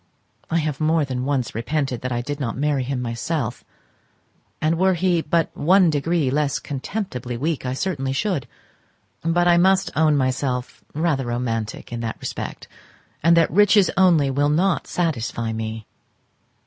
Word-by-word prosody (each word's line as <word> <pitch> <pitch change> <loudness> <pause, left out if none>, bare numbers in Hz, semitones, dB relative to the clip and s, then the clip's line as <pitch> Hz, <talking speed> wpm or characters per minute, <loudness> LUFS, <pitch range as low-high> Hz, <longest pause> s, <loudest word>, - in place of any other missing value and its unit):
I 165 - +1
have 155 -2 -2
more 155 0 +2
than 130 -2 -3
once 135 -4 -1
repented 130 +2 -2
that 130 - -3
I 120 0 -1
did 145 +3 -5
not 125 -4 -3
marry 145 -1 +1
him 125 0 -3
myself; 120 +2 -3 1.0
and 160 +2 +1
were 190 0 +3
he 175 -1 +1
but 165 +1 0
one 180 +2 +4
degree 150 -1 0
less 145 -1 +1
contemptibly 135 - -4
weak 150 0 -2
I 125 - -1
certainly 135 -3 -2
should: 145 - -1 0.7
but 175 +2 +2
I 175 -1 +5
must 190 +2 +3
own 155 -1 +3
myself 130 -1 -2
rather 150 -5 0
romantic 115 -2 -3
in 120 - -3
that 115 -1 -4
respect, - - -6 0.5
and 170 +2 +5
that 165 - +4
riches 205 +2 +5
only 170 -7 +4
will 145 +2 +1
not 175 +4 +1
satisfy 115 -9 -2
me. 110 0 -5
145 Hz, 155 wpm, -22 LUFS, 125-170 Hz, 1.0 s, I